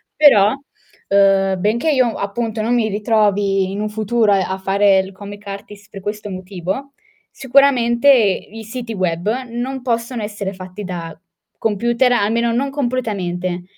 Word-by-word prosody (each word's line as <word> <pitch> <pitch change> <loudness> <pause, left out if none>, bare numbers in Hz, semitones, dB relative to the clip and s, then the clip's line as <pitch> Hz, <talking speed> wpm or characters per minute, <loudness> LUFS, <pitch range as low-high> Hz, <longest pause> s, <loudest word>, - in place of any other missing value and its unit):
Però, 215 -8 +6 0.6
ehm, 195 -1 +3
benché 235 - +1
io 255 -5 +2
appunto 220 +2 -3
non 235 +3 +1
mi 230 -3 +2
ritrovi 205 -2 +1
in 200 +2 -4
un 215 - -2
futuro 220 0 +1
a 190 -1 +1
fare 195 0 +3
il 190 0 -3
comic 205 +1 -10
artist 205 +1 -9
per 195 - -9
questo 205 +1 -5
motivo, 190 +8 -5 0.4
sicuramente 265 -1 +3
i 220 -2 +2
siti 230 +1 -6
web 180 -1 -1 0.2
non 250 +3 -4
possono 235 -1 -2
essere 205 -2 -4
fatti 185 +2 -8
da 170 -3 -6 0.4
computer, 235 +4 +1
almeno 230 +2 +1
non 270 +4 0
completamente. 195 -10 -2
210 Hz, 140 wpm, -19 LUFS, 195-235 Hz, 0.6 s, Però